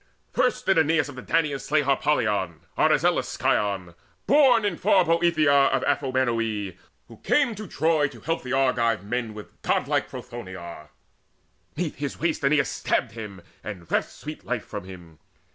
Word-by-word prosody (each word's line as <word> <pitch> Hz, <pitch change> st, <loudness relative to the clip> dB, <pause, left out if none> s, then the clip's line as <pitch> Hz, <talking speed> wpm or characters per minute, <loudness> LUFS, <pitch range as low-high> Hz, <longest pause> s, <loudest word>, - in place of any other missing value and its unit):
First -, -, 0 dB
did 190 Hz, -4 st, +4 dB
Aeneas 160 Hz, -1 st, +2 dB
of 145 Hz, -, -9 dB
the 130 Hz, -, -7 dB
Danaans 150 Hz, -3 st, 0 dB
slay 150 Hz, 0 st, +2 dB
Harpalion, 105 Hz, -, 0 dB
Arizelus' -, -, +2 dB
scion, 95 Hz, -4 st, 0 dB, 0.3 s
born 260 Hz, -6 st, +5 dB
In 200 Hz, -4 st, 0 dB
far 190 Hz, 0 st, +3 dB
Boeotia 165 Hz, -3 st, +3 dB, 0.2 s
of 130 Hz, -1 st, +1 dB
Amphinome, 115 Hz, -7 st, 0 dB, 0.3 s
Who 115 Hz, -, -14 dB
came 280 Hz, -, +2 dB
to 215 Hz, 0 st, -8 dB
Troy 155 Hz, -1 st, +2 dB
to -, -, -13 dB
help 165 Hz, 0 st, -2 dB
the 130 Hz, -, -7 dB
Argive 120 Hz, -6 st, +2 dB
men 115 Hz, 0 st, -3 dB
With 105 Hz, -, -12 dB
godlike -, -, 0 dB
Prothoenor. 90 Hz, -10 st, -9 dB, 0.9 s
'Neath 165 Hz, -2 st, -3 dB
his 140 Hz, -1 st, -4 dB
waist 165 Hz, -3 st, -1 dB
Aeneas 140 Hz, -1 st, +3 dB
stabbed, -, -, -1 dB
and 95 Hz, -3 st, -9 dB
reft -, -, +1 dB
sweet -, -, -9 dB
life -, -, -3 dB
from -, -, -7 dB
him. 85 Hz, -4 st, -12 dB
130 Hz, 150 wpm, -25 LUFS, 105-160 Hz, 0.9 s, born